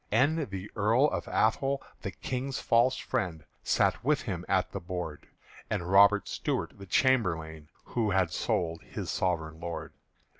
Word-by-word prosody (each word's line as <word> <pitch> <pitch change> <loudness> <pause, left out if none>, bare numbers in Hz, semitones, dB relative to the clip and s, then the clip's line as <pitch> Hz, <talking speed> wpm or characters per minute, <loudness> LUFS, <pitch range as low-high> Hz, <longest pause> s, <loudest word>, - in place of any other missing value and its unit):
And 145 +5 +2
the 95 +1 -6
Earl 115 +6 +4
of - - -3
Athole, 135 +5 +1 0.2
the - - -3
King's 130 +1 -4
false 120 +3 +3
friend, 80 -4 -3 0.2
Sat 95 +2 +2
with 145 +2 +2
him 90 -6 -4
at 95 -1 +2
the 100 - -4
board; 90 -4 -5 0.4
And 85 +1 -2
Robert 100 0 +6
Stuart - - -2
the 100 - -10
chamberlain 80 - +1
Who 115 -3 -1
had 95 -4 +2
sold 80 -1 -1
his - - -5
sovereign 80 -4 -1
Lord. 85 0 -5
95 Hz, 150 wpm, -29 LUFS, 85-120 Hz, 0.4 s, Robert